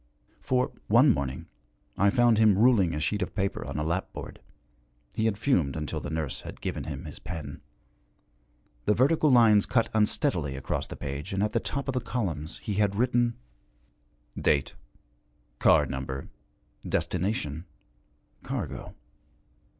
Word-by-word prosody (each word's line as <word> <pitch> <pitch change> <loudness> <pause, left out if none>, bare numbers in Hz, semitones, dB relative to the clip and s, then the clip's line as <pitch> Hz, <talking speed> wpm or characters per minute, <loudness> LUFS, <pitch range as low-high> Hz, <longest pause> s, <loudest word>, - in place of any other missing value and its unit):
For, 125 -1 +1 0.2
one 125 +6 +6
morning, 65 -4 -4 0.5
I 100 +2 +4
found 120 0 +4
him 105 -3 +5
ruling 105 -8 +4
a - - -2
sheet 105 +7 -1
of 90 - -3
paper 95 -1 -1
on - - -5
a 75 - -1
lapboard 80 +2 -4 0.7
he 110 - 0
had 110 -3 +1
fumed 90 - +1
until 75 -1 -3
the - - -6
nurse 80 -3 -3
had - - -9
given - - -4
him 75 +1 -6
his 75 - -9
pen. 80 -1 -7 1.2
The 105 - +3
vertical 150 +4 +3
lines 115 -5 +6
cut 115 -3 +2
unsteadily 105 - +1
across 65 - -3
the - - -7
page, 70 +4 -5
and 95 +1 +1
at 105 - 0
the 115 - +2
top 140 +4 -4
of 135 - -1
the 125 - -1
columns 90 -10 -3
he 105 - -4
had 100 -1 +1
written: 120 +1 +2 1.0
'Date.' 70 -1 +1 0.9
'Car - - +5
Number.' 65 0 -5 0.5
'Destination.' 90 -4 -1 0.8
'Cargo.' - - -5
100 Hz, 145 wpm, -28 LUFS, 75-115 Hz, 1.2 s, one